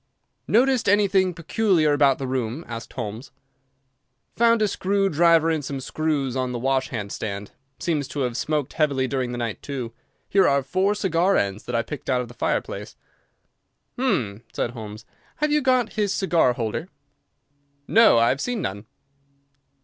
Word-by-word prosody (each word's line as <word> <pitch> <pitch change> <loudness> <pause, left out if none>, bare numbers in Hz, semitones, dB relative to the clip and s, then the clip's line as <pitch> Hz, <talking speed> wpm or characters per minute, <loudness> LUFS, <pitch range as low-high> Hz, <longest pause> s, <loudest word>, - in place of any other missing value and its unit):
"Noticed 250 -1 +3
anything 195 -2 +3
peculiar 170 -2 +1
about 140 -2 +4
the 135 - -4
room?" 130 +3 -3
asked 115 -1 -7
Holmes. 110 +6 -6 1.0
"Found 230 -1 +4
a - - +3
screw 195 0 0
driver 165 0 +4
and 155 -2 -1
some 140 0 -4
screws 140 -2 -2
on 130 -1 -1
the - - -2
wash 130 +2 0
hand 105 -5 -5
stand. 100 -1 -5 0.3
Seems 155 -5 -1
to 145 - -4
have 125 -2 -1
smoked 150 +2 -1
heavily 140 -4 +1
during 130 -2 -2
the 120 - -4
night, 115 -3 -4
too. 130 -5 -5 0.3
Here 195 -1 +4
are 140 -1 +2
four 190 +9 +1
cigar 190 -1 +2
ends 100 +1 -2
that 125 - -3
I 115 - +1
picked 150 +1 -7
out 130 -1 +2
of 120 - -7
the - - -11
fireplace." 115 - -3 1.0
"Hum!" 115 - -1
said 120 - -2
Holmes, 110 -2 -9 0.3
"have 300 0 0
you 300 0 +3
got 255 -3 +2
his 210 -3 0
cigar 170 -10 +2
holder?" 120 - -3 1.0
"No, 225 - +6
I 115 0 +4
have 140 - 0
seen 245 -2 -2
none." 100 - -4
145 Hz, 165 wpm, -24 LUFS, 120-190 Hz, 1.0 s, No